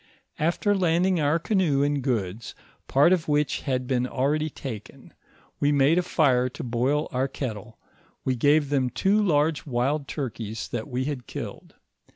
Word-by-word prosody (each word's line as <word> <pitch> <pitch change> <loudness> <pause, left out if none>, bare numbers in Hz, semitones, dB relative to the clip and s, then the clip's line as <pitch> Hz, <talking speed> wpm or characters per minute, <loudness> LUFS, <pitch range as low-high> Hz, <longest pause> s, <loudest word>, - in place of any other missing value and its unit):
After 175 +6 +1
landing 180 -1 +2
our 150 +2 +2
canoe 165 -7 +1
and 145 -1 0
goods, 115 -5 -3 0.3
part 145 +7 +5
of 170 -3 -1
which 150 0 +1
had 130 -3 -1
been 125 -1 0
already 150 +5 0
taken, 115 -8 -9 0.5
we 145 - +2
made 145 +4 +4
a - - +3
fire 130 -8 +2
to - - -8
boil 130 +5 0
our 130 +2 0
kettle; 110 -5 -6 0.5
we 130 - +1
gave 145 +3 +3
them 130 -3 +2
two 195 - +2
large 155 -5 +1
wild 135 +3 0
turkeys 115 -7 -5
that 115 -2 -4
we 130 -1 -2
had 135 -4 -4
killed. - - -8
140 Hz, 160 wpm, -25 LUFS, 125-155 Hz, 0.5 s, part